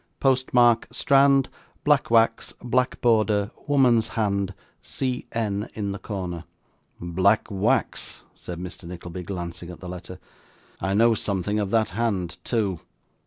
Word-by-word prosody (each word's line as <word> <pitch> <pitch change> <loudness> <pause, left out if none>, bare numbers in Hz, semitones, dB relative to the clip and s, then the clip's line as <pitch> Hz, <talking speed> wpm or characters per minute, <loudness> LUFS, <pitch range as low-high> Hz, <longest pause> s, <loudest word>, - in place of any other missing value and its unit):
'Post 130 -1 +2
mark, 120 -2 +4
Strand, 135 -1 +4 0.4
black 150 -2 +3
wax, 115 0 +2
black 125 +1 +1
border, 110 -3 +2 0.2
woman's 125 -6 +4
hand, 100 -3 0 0.3
C. 125 - -3
N. 105 -2 -2
in 100 -2 -2
the 100 - -5
corner.' 90 -5 -5 0.6
'Black 95 +5 +2
wax?' 95 -1 -1
said 90 - -8
Mr. 90 0 -8
Nickleby, 85 +1 -7
glancing 85 -1 -6
at 90 - -9
the 90 - -9
letter. 90 0 -8 0.6
'I 95 +2 -1
know 115 +2 +5
something 105 -1 -1
of 100 -2 -1
that 110 0 +2
hand, 100 -7 -1
too. 100 -7 0
105 Hz, 135 wpm, -25 LUFS, 90-115 Hz, 0.6 s, know